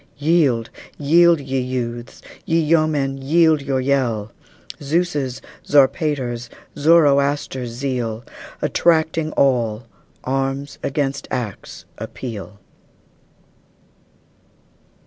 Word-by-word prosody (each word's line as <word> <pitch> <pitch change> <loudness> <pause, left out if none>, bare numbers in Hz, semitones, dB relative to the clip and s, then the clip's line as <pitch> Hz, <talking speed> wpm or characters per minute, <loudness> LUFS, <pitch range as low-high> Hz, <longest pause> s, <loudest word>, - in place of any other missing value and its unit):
Yield, 145 -7 +2 0.3
yield, 170 +3 +4
ye 135 -1 -2
youths! 120 -2 -4 0.2
ye 165 0 +1
yeomen, 150 -4 +1
yield 160 +2 +3
your 135 -1 -1
yell! 125 -6 0 0.5
Zeus', 145 -4 -1 0.2
Zarpater's, 135 -4 +1 0.3
Zoroaster's 140 -4 +3
zeal, 120 -2 -3 0.4
Attracting 160 -1 +1
all, 120 -5 +1 0.4
arms 135 +2 -2
against 140 -1 -2
acts 115 -6 -5
appeal! 105 -5 -7
135 Hz, 75 wpm, -20 LUFS, 125-155 Hz, 0.5 s, yield